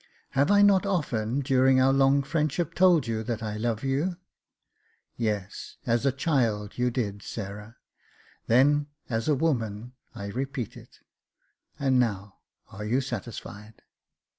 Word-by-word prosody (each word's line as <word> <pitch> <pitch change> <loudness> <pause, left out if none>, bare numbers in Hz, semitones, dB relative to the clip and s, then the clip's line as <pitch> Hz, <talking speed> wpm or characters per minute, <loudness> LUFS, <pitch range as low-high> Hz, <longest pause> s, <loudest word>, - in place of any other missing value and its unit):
Have 140 +5 +2
I 205 0 +6
not 200 -2 +5
often, 140 - -1
during 130 0 +4
our 135 +1 +4
long 135 +1 +4
friendship, 160 +2 -1
told 175 -4 +4
you 115 -2 -2
that 115 0 -4
I 105 -1 -3
love 115 +1 -2
you? 145 +7 -1 0.3
" - - -52
" - - -40 0.2
Yes, 105 -4 -3
as 120 +3 +1
a - - +4
child 120 -8 0
you 125 0 +2
did, 105 -5 -3
Sarah." 105 +2 -7 0.4
" - - -31
Then, 145 +5 +4 0.2
as 115 0 -1
a 150 - +3
woman, 120 -6 -1 0.2
I 100 - -6
repeat 130 +1 -4
it. - - -15 0.8
And 130 -2 +2
now 100 -4 -1 0.3
are 100 +2 -7
you 115 +5 +1
satisfied 110 -4 -7
125 Hz, 150 wpm, -27 LUFS, 110-140 Hz, 0.8 s, I